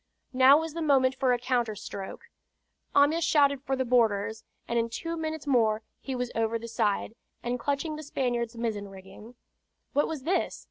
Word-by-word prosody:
Now 260 +3 +7
was 320 -1 -4
the 335 - -4
moment 270 -4 +3
for 260 -1 +1
a 245 - +3
counter 240 -3 0
stroke. 195 -1 -7 0.7
Amyas 300 +4 +4
shouted 285 -5 +3
for 270 -1 -1
the 260 0 -1
boarders, 220 -3 +1 0.2
and 235 0 +1
in 230 0 0
two 330 +8 -4
minutes 315 -2 -4
more 225 -5 +2 0.2
he 265 - -5
was 250 -1 -3
over 225 0 0
the 230 +1 -8
side, 215 -2 0 0.3
and 245 +1 -2
clutching 285 +4 -1
at - - -6
the 310 - -7
Spaniard's 240 -4 -2
mizzen 220 -3 -2
rigging. 195 +5 -13 0.6
What 290 - +2
was 310 -5 -5
this? 360 +6 0
250 Hz, 185 wpm, -28 LUFS, 225-285 Hz, 0.7 s, Now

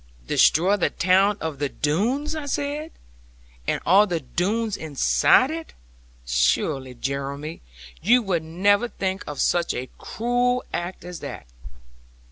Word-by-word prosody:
'Destroy 180 - +4
the 185 - +1
town 190 +3 +3
of 160 -4 -4
the 145 -1 -1
Doones,' 235 - -1
I 300 -2 -5
said, 290 +3 -3 0.8
'and - - 0
all 195 +5 +6
the 175 -3 -1
Doones 205 - -1
inside 160 - +3
it! 325 0 -6 0.5
Surely, 95 - 0
Jeremy, 140 +4 -4 0.4
you 240 +6 +4
would 180 -5 0
never 200 +8 +2
think 190 -3 -3
of 145 -2 -6
such 175 -1 +1
a 130 +1 -5
cruel 245 +2 0
act 175 +1 -4
as 180 -1 -7
that!' - - -7
185 Hz, 130 wpm, -24 LUFS, 150-230 Hz, 0.8 s, all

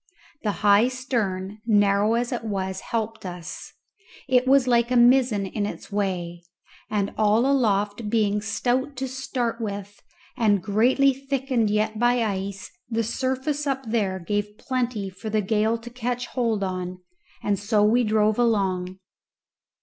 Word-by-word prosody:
The 210 - 0
high 205 +3 +6
stern, 215 -6 -3
narrow 205 0 +3
as 240 +2 -1
it 240 -2 -3
was, 190 -3 -3
helped 225 -1 -3
us; 175 -3 -7 0.6
it 255 -1 +3
was 270 -1 +5
like 235 -1 +3
a 250 - +1
mizzen 240 -4 +4
in 205 +1 -2
its 210 - -8
way; 180 -4 -2 0.5
and 205 -2 -1
all 215 +3 +4
aloft 210 -5 +1
being 210 -2 +1
stout 250 +6 -1
to 265 +1 -3
start 250 -2 -3
with 205 -1 -6 0.3
and 210 -3 +3
greatly 250 +6 +3
thickened 265 -4 -1
yet 215 +1 0
by 240 0 +3
ice, 195 -2 -4 0.2
the 230 -1 0
surface 265 +5 -2
up 270 -1 -1
there 200 -5 0
gave 205 +3 -3
plenty 245 -6 -2
for 215 +4 -7
the 215 0 +1
gale 215 +2 +1
to 235 +1 -11
catch 245 0 -3
hold 230 -5 -1
on; 185 -1 -3 0.5
and 200 -2 0
so 205 0 +2
we 235 +4 +4
drove 215 0 +2
along. 190 -6 +1
220 Hz, 150 wpm, -24 LUFS, 200-245 Hz, 0.6 s, high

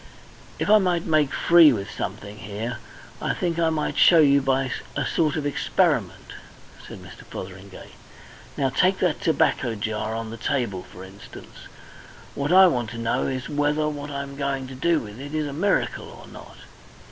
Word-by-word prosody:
"If - - -2
I 215 +1 +6
might 180 -3 0
make 155 -3 +2
free 170 -3 +6
with 100 -5 -4
something 105 +2 -6
here, 105 +4 -5 0.4
I - - -1
think 170 -2 -2
I 165 -1 +3
might 155 -2 -2
show 170 - +7
you 140 -3 +5
by 135 -1 0 0.2
a - - -1
sort 155 -3 0
of 155 -2 -3
experiment," 145 - 0 0.5
said - - -10
Mr. - - -13
Fotheringay. 95 +1 -10 0.7
"Now, 135 -1 +1
take 185 +8 +2
that 180 -2 0
tobacco 150 - +1
jar 110 +1 -3
on 115 -1 -5
the 115 - -7
table, 115 -7 -2
for 90 - -13
instance. 95 +1 -13 0.7
What 140 +3 -2
I 190 +1 +8
want 120 -10 +1
to 120 - -8
know 115 0 -1
is 130 -1 -4
whether 150 +1 0
what 145 -1 -6
I 140 -1 -4
am 140 0 -10
going 140 -1 -2
to - - -8
do 160 +5 +1
with 105 +1 -10
it 145 +3 -7
is 155 -1 -1
a 145 - -5
miracle 185 +6 -1
or - - -13
not. - - -13
140 Hz, 180 wpm, -24 LUFS, 115-155 Hz, 0.7 s, I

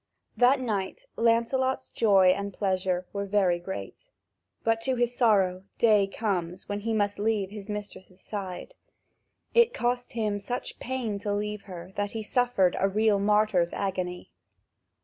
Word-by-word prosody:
That 255 +3 +5
night 205 -7 -3
Lancelot's 235 +3 +1
joy 195 -4 +5
and 200 +2 0
pleasure 185 -2 -1
were 200 0 -3
very 190 -4 +2
great. 175 - -7 0.6
But, 225 0 +1
to 260 +2 0
his 240 0 0
sorrow, 195 -6 +3
day 210 -4 +4
comes 185 -4 -3
when 205 0 -3
he 225 +2 -3
must 205 -2 0
leave 205 -2 0
his 210 0 -9
mistress' 200 -3 -7
side. 195 - -6 0.8
It 470 0 +4
cost 245 0 -1
him 215 -3 -1
such 245 +5 -5
pain 240 -5 -3
to 205 +1 -3
leave 210 0 -3
her 180 -2 -9
that 205 0 -2
he 220 -1 -4
suffered 225 -6 +2
a 195 - +2
real 210 0 +2
martyr's 210 -4 +2
agony. 185 -2 -3
205 Hz, 150 wpm, -27 LUFS, 190-225 Hz, 0.8 s, That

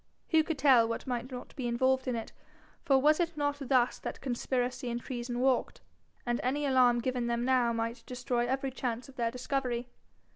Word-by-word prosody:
Who 320 -2 +5
could 320 -1 -3
tell 260 -5 +5
what 230 - -4
might 250 0 -3
not 250 -1 -8
be 260 -4 -3
involved 260 +2 +1
in 250 - 0
it? 225 -1 -5 0.5
For 270 - +4
was 300 +4 +4
it 340 -2 -1
not 290 -1 0
thus 255 -2 +2
that - - -6
conspiracy 250 0 -2
and 235 0 -2
treason 240 0 -4
walked? 260 -1 +1 0.4
And 240 0 0
any 285 +4 0
alarm 250 -3 +4
given 250 -1 -1
them 235 0 0
now 250 -2 +3
might 230 +1 -3
destroy 245 -1 -1
every 265 +1 -1
chance 250 0 -4
of 270 - -14
their 235 -2 0
discovery. 250 -1 -2
250 Hz, 190 wpm, -31 LUFS, 240-270 Hz, 0.5 s, Who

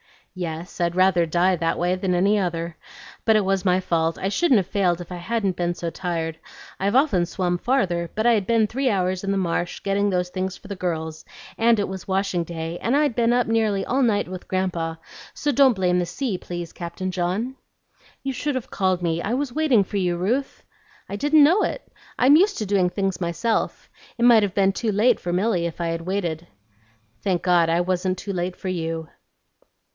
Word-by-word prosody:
"Yes, 170 -1 -6
I'd 170 0 0
rather 185 -2 +4
die 175 +3 +2
that 165 0 0
way 175 +1 +1
than 185 -1 -1
any 200 +4 +3
other. 170 -2 -3 0.5
But 220 - +5
it 215 - +3
was 195 -1 0
my 180 0 +3
fault; 165 -2 0
I 190 - -2
shouldn't 270 - +3
have 195 - +1
failed 180 -2 +1
if 175 - -10
I 180 - -5
hadn't 195 0 -1
been 175 0 -1
so 170 -1 -3
tired. 165 -3 -3 0.4
I've 200 +4 0
often 255 - +3
swum 175 0 -1
farther; 175 -8 0
but 220 +2 -1
I'd 225 -5 +3
been 230 -2 +3
three 260 +5 -1
hours 185 -3 0
in 195 - 0
the 195 - 0
marsh 175 -1 -2
getting 200 +1 +1
those 180 -2 0
things 185 +1 -3
for 200 - -15
the 200 - -4
girls, 160 -3 -4 0.3
and 230 -1 +4
it 205 - 0
was 190 -1 -7
washing 190 -3 0
day, 165 0 -5
and 240 +4 +1
I'd 295 -3 +2
been 235 0 +2
up 245 -1 +2
nearly 220 -3 +1
all 265 +3 0
night 220 -5 +2
with 185 0 -8
Grandpa; 175 -3 -1 0.4
so 290 - -1
don't 270 -1 +5
blame 180 -3 +1
the 175 - 0
sea, 200 +3 -3
please, 175 -2 -6
Captain 175 +2 -5
John." 185 +8 -2 0.7
"You 270 - -1
should 285 +2 -2
have 255 - -5
called 185 -2 0
me; 165 0 0
I 215 - -2
was 265 -1 -2
waiting 285 -9 +3
for 200 - -5
you, 180 -2 +1
Ruth." 240 +10 -2 0.5
"I 200 - -4
didn't 295 +5 +5
know 350 +8 +5
it. - - -3 0.3
I'm 275 +4 +6
used 400 +4 +3
to 215 - -2
doing 190 -3 +2
things 195 -2 -2
myself. 200 +7 -1 0.3
It 235 - -1
might 235 -3 +7
have 200 -2 -2
been 195 -1 +3
too 215 +2 -2
late 225 +4 +3
for 175 - -3
Milly 185 -2 +1
if 165 - -8
I'd 165 0 -2
waited." 175 -3 -3 0.7
"Thank 180 -4 0
God, 175 -2 +3
I 170 +1 +2
wasn't 185 +1 -1
too 200 +2 -5
late 180 0 -2
for 190 - -5
you." 165 -2 -3
185 Hz, 210 wpm, -23 LUFS, 175-220 Hz, 0.7 s, might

